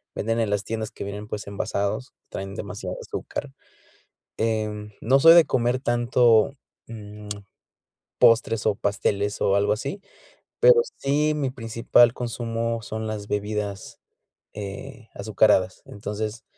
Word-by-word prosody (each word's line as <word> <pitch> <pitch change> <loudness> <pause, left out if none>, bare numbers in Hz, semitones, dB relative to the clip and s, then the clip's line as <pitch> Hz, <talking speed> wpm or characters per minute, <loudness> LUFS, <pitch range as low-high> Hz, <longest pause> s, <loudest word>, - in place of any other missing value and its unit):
venden 115 +2 -1
en 110 -2 +1
las 105 -1 0
tiendas 110 -1 -4
que - - -7
vienen, 105 +1 -6
pues, 105 - -5
envasados, 100 +4 -2 0.2
traen 95 0 -6
demasiada - - -5
azúcar, 65 - -6 0.9
em, 105 -2 -2
no 130 +4 +4
soy 165 +2 +9
de 170 -2 +7
comer 125 0 +1
tanto, 120 -1 +3 0.4
mm, 105 -2 -10 0.9
postres 115 -1 +4
o 105 - +2
pasteles 100 0 -1
o 100 - +3
algo 100 +1 +3
así, 140 - -5 0.6
pero 485 -1 +7 0.2
sí, 150 +2 +1
mi 140 -3 -1
principal 115 0 +3
consumo 115 -1 -3
son 110 +1 -4
las 105 -1 -5
bebidas, 105 -1 -3 0.6
eh, 105 +4 -8
azucaradas, 100 -3 +2
entonces, 105 +2 -5
110 Hz, 125 wpm, -24 LUFS, 105-120 Hz, 0.9 s, soy